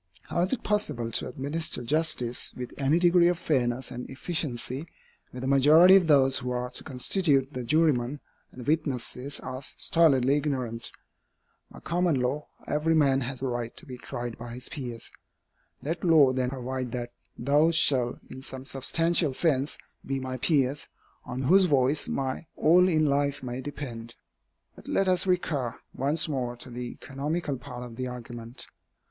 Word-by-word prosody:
How - - -1
is 180 +2 +1
it 265 - -1
possible 150 - -1
to - - 0
administer 140 +3 -2
justice 135 -3 0
with 125 -1 -6
any 140 +3 +2
degree 175 0 +5
of 175 -1 +1
fairness 125 -6 0
and 125 - -7
efficiency, 135 -1 -3 0.4
where 125 - -8
the 130 - -3
majority 155 +7 +7
of 185 -4 +4
those 135 -3 +5
who 125 - -4
are 125 0 -3
to - - -3
constitute 140 0 +1
the 125 - -4
jurymen 145 -2 +1 0.3
and 125 - -10
the 120 - -10
witnesses 140 -3 -1
are 130 +1 -6
stolidly 140 -2 +2
ignorant? 130 -6 -2 0.8
By - - -13
common 170 -4 +1
law, 130 +4 -2 0.2
every 155 +2 +1
man 135 -3 +3
has 130 +1 -4
a - - 0
right 120 -2 -4
to - - -6
be 130 - -8
tried 120 -2 -6
by 120 0 -7
his 125 0 -6
peers. 120 -5 -6 0.7
Let 165 +4 -3
law 155 -7 +5
then 130 -1 0
provide 130 -1 -4
that 120 -1 -3 0.3
those 150 +6 +3
shall, 125 -6 +3
in 130 - -10
some 130 0 -7
substantial 155 +2 +1
sense, 145 -3 +1 0.3
be 135 0 -2
my 130 0 -4
peers, 140 0 +1 0.4
on 125 +1 -4
whose 185 +8 +5
voice 140 -2 +2
my 135 +4 -3
all 180 +4 +5
in 155 -3 +2
life 140 -1 0
may 125 +1 -4
depend. 125 -5 -7 0.6
But - - -14
let 195 - +1
us 185 0 +2
recur 150 -9 -1
once 145 +6 +2
more 125 -5 -2
to 125 +1 -6
the 120 0 -6
economical 145 +1 -3
part 125 -1 -8
of 115 -2 -11
the 130 0 -3
argument. 120 -1 -7
135 Hz, 165 wpm, -27 LUFS, 125-155 Hz, 0.8 s, majority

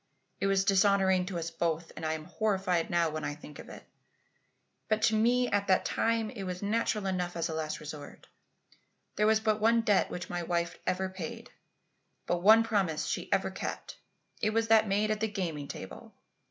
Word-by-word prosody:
It 195 - +1
was 195 0 +2
dishonouring 190 -2 +3
to 190 -3 -4
us 165 0 -4
both, 165 0 -2
and - - -8
I'm 155 0 -2
horrified 190 -5 0
now 170 -2 +2
when 155 0 -4
I 145 - -3
think 150 -1 -12
of - - -10
it. - - -10 1.1
But 215 0 +1
to 220 - +4
me 245 +3 +3
at 200 0 0
that 185 - +3
time 225 -1 0
it 235 -6 -8
was 185 0 -5
natural 210 0 0
enough 180 -2 -2
as 165 - -1
a - - -3
last 155 -1 -3
resort. 150 -1 -9 0.9
There 210 +1 +2
was 220 0 +4
but 215 -1 0
one 230 +1 +4
debt 205 -3 +2
which 175 - -5
my 175 0 -3
wife 170 0 -2
ever 185 +1 0
paid, 185 -3 -7 0.7
but 175 0 -1
one 220 +4 +7
promise 195 -8 0
she - - -3
ever - - +1
kept. - - -6 0.4
It 215 0 +1
was 225 0 +1
that 220 -1 +5
made 205 +2 +1
at 215 - -1
the 220 - 0
gaming 170 -9 -4
table. 95 - -9
190 Hz, 195 wpm, -30 LUFS, 170-215 Hz, 1.1 s, one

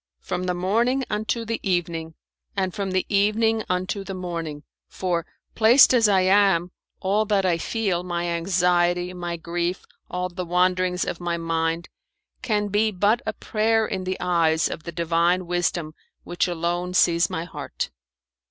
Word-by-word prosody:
"From 180 - -3
the 180 0 -1
morning 230 +9 +1
unto 220 +2 -1
the 230 +1 -2
evening, 165 -4 -2 0.4
and 190 -2 0
from 200 -2 -3
the 185 0 0
evening 215 +2 +2
unto 185 +2 -1
the 195 -1 -6
morning, 165 -5 -5 0.3
for, 175 -3 -2 0.3
placed 235 +5 +6
as 230 -3 +5
I 195 -2 +4
am, 185 -2 +3 0.3
all 200 +3 +2
that 200 -2 +1
I 170 -2 +2
feel 195 -2 -1
my 175 -1 -3
anxiety, 175 +1 +1
my 175 -1 -4
grief, 175 +2 -3 0.2
all 180 0 -2
the 180 0 -5
wanderings 180 +1 +1
of 170 - -4
my 175 -1 -2
mind 165 0 -1 0.5
can 210 -4 0
be 210 +2 +2
but 210 +4 +2
a 220 - 0
prayer 220 +1 +1
in 190 -3 -3
the 185 0 -2
eyes 165 -3 +2
of 155 - -7
the 170 - -5
Divine 170 +2 +1
Wisdom 175 -2 -1 0.3
which 175 +1 -1
alone 175 +1 -2
sees 170 -1 +4
my 165 - -3
heart." 175 - -5
180 Hz, 160 wpm, -24 LUFS, 170-200 Hz, 0.5 s, placed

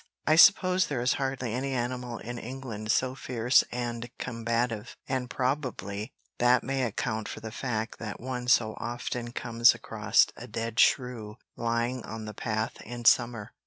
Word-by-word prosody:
I 155 - +5
suppose 185 +2 +6
there 125 -5 -2
is 125 - +3
hardly 130 -4 -2
any 135 +2 -2
animal 125 -1 -3
in 120 +1 -6
England 120 -4 -6
so 130 0 +1
fierce 125 -1 +2
and 120 -1 -4
combative, 115 -1 -2
and 130 -2 -2
probably 125 -6 -2 0.3
that 125 0 +4
may 135 +1 -1
account 110 -1 -2
for - - -6
the 110 0 -7
fact 115 -2 -3
that 105 -2 -6
one 125 -1 -4
so 110 -3 +4
often 120 0 -4
comes 120 -1 +4
across - - +2
a - - -9
dead 115 0 -3
shrew 120 -5 +2 0.2
lying 115 +1 -1
on 110 0 -7
the 105 - -6
path 110 +1 -3
in 120 0 -7
summer. 115 -2 +3
120 Hz, 160 wpm, -28 LUFS, 115-125 Hz, 0.3 s, suppose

